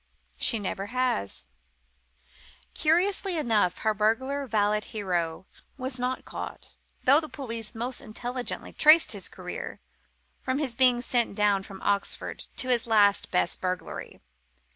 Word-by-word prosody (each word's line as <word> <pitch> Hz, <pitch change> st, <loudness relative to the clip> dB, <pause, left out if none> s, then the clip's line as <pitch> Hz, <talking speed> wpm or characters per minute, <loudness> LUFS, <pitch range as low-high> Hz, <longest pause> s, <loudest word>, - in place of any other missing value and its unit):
She 230 Hz, -, +4 dB
never 200 Hz, -1 st, -3 dB
has. 245 Hz, -, -1 dB, 1.3 s
Curiously 360 Hz, +3 st, +2 dB
enough, 220 Hz, -, +2 dB
her 220 Hz, -, +3 dB
Burglar 260 Hz, +7 st, 0 dB
Valet 210 Hz, -1 st, +2 dB
Hero 180 Hz, -6 st, -2 dB, 0.3 s
was 260 Hz, -1 st, -4 dB
not 250 Hz, +1 st, -2 dB
caught, -, -, -7 dB, 0.3 s
though 280 Hz, +3 st, +6 dB
the 310 Hz, -1 st, -7 dB
police 230 Hz, -5 st, -4 dB
most 240 Hz, +3 st, -4 dB
intelligently 245 Hz, +3 st, -4 dB
traced 310 Hz, +2 st, +6 dB
his -, -, -2 dB
career, -, -, -7 dB, 0.6 s
from 260 Hz, +1 st, -1 dB
his 275 Hz, -5 st, -2 dB
being 250 Hz, -1 st, +4 dB
sent 240 Hz, -4 st, 0 dB
down 205 Hz, -1 st, +3 dB
from 195 Hz, 0 st, -11 dB
Oxford 200 Hz, 0 st, -1 dB
to 255 Hz, -, -1 dB
his 240 Hz, -2 st, +2 dB
last 205 Hz, -3 st, +4 dB
best 180 Hz, -1 st, 0 dB
burglary. 185 Hz, -1 st, -4 dB
230 Hz, 130 wpm, -27 LUFS, 205-260 Hz, 1.3 s, though